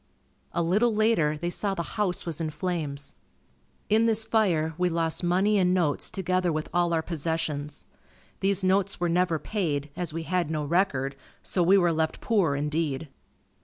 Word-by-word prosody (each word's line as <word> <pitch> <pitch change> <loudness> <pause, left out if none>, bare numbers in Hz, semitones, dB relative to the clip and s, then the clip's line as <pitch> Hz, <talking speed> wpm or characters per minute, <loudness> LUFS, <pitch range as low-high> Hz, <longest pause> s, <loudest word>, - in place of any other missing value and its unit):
A 170 - 0
little 210 +7 +2
later, 210 -9 +2
they 175 +3 -3
saw 195 +1 -1
the 170 - -2
house 200 -4 -1
was 170 -1 -3
in 160 - -1
flames. 150 -3 -4 0.7
In 220 +2 +3
this 225 -1 +3
fire, 185 -8 +1
we 180 +2 +1
lost 165 0 -1
money 190 +4 +3
and 180 0 +3
notes 165 -6 0
together 185 -2 0
with 155 0 -2
all 175 0 +2
our 165 -1 +1
possessions. 155 -3 -3 0.5
These 195 0 +2
notes 195 +1 +1
were 175 -1 0
never 175 -1 +2
paid, 150 -7 -2
as 175 -3 -3
we 165 +1 -4
had 180 -2 -1
no 155 -2 -2
record 140 -5 0 0.3
so 180 - -1
we 185 +3 +5
were 175 -3 +3
left 160 0 -1
poor 195 -11 +1
indeed. 150 0 -2
170 Hz, 170 wpm, -27 LUFS, 155-190 Hz, 0.7 s, we